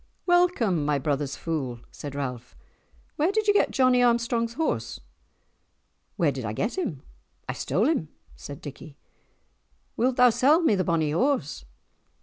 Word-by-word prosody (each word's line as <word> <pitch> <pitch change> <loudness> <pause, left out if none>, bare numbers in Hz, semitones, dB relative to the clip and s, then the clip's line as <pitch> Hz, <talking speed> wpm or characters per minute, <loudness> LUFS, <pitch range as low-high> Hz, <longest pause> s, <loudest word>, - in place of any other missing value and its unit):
"Welcome, 350 - +2
my 145 0 +1
brother's 140 0 -2
fool!" 135 -8 -4
said 145 -1 -8
Ralph. 125 -4 -5 0.6
"Where 315 +6 +2
did 430 +1 -1
ye 410 - +5
get 410 - +3
Johnie 255 -2 +3
Armstrong's 235 -1 +1
horse?" 115 - -2 1.2
"Where 160 -4 +2
did 135 -2 -6
I 105 -1 -3
get 210 - -2
him? 260 - -4 0.4
I - - -2
stole 205 - 0
him," 300 - 0 0.3
said 140 -1 -9
Dickie. 145 0 -10 1.0
"Wilt 250 +2 +1
thou 250 -1 +6
sell 265 +8 +4
me 315 - +4
the 190 -2 +1
bonny 160 -3 0
horse?" 160 - 0
185 Hz, 145 wpm, -26 LUFS, -, 1.2 s, thou